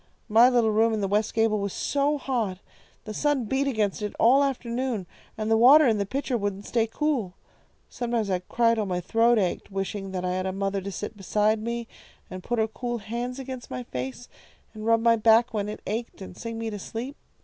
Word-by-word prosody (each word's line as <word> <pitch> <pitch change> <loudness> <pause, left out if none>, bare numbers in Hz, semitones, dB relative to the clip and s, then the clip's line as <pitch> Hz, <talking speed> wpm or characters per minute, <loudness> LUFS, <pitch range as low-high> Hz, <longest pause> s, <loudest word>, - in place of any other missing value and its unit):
My 230 +4 +7
little 235 -3 +3
room 225 +1 +3
in 215 - -2
the 195 - 0
west 210 +2 +1
gable 225 -1 +2
was 200 -1 -3
so 285 +1 0
hot. 235 -9 -2 0.5
The 215 - -6
sun 290 -1 +1
beat 265 +5 0
against 215 -6 0
it 210 -1 -4
all 265 +5 +6
afternoon, 245 -5 -2 0.3
and 215 0 -2
the - - +6
water 280 +7 +8
in 220 -4 +2
the 200 - -1
pitcher 270 +2 -2
wouldn't 205 -2 -3
stay 230 -2 +1
cool. 235 -7 -1 0.5
Sometimes 235 -3 -2
I'd 185 -2 -2
cry 230 -1 +3
till 215 -3 -1
my 180 -1 -1
throat 230 +6 +3
ached, 185 -4 -1
wishing 195 0 -4
that 185 -1 -2
I 180 - 0
had 185 +1 -1
a - - -1
mother 195 +1 -2
to 200 +1 -5
sit 210 +4 -6
beside 210 +2 +1
me, 235 +1 -3 0.4
and 185 0 -6
put 240 +5 -2
her 220 0 +2
cool 240 +2 -4
hands 235 +4 -4
against 260 -2 -7
my 125 -1 -5
face, 130 - -6 0.5
and 215 0 -6
rub 230 0 +4
my 230 -1 +5
back 225 +2 +4
when 210 -1 -2
it 210 - -7
ached, 230 +3 -4
and 190 -2 -9
sing 230 +2 -6
me 225 -1 -3
to 205 - -5
sleep. 240 +8 -6
225 Hz, 215 wpm, -26 LUFS, 200-240 Hz, 0.5 s, water